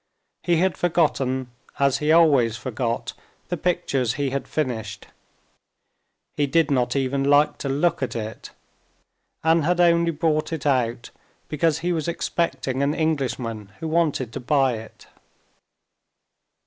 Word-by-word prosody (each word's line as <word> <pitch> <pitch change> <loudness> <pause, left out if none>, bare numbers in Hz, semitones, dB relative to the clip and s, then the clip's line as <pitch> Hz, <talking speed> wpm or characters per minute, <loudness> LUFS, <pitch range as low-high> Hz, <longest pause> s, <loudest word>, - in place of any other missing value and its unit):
He 175 - +1
had 185 +2 +1
forgotten, 135 -7 0 0.3
as 140 -2 +2
he 150 +1 +1
always 140 -9 +4
forgot, 120 -2 -3 0.4
the 175 - -1
pictures 145 -8 0
he 140 -1 -2
had 140 0 -3
finished. 115 -9 -3 1.3
He 145 - +1
did 160 +1 +2
not 125 -2 +1
even 135 0 0
like 145 +1 +3
to 140 - -3
look 150 +5 +1
at 130 - -3
it, 110 -1 -6 0.9
and 160 0 +3
had 175 +3 +1
only 170 -1 +4
brought 155 -1 0
it 160 -4 -4
out 125 -4 0 0.4
because 155 +1 +1
he 180 - +1
was 160 -1 -2
expecting 140 -6 -2
an 140 +2 +1
Englishman 125 -9 -2
who 165 - -4
wanted 155 -7 0
to - - -4
buy 135 0 +2
it. 110 0 -12
145 Hz, 135 wpm, -23 LUFS, 130-165 Hz, 1.3 s, always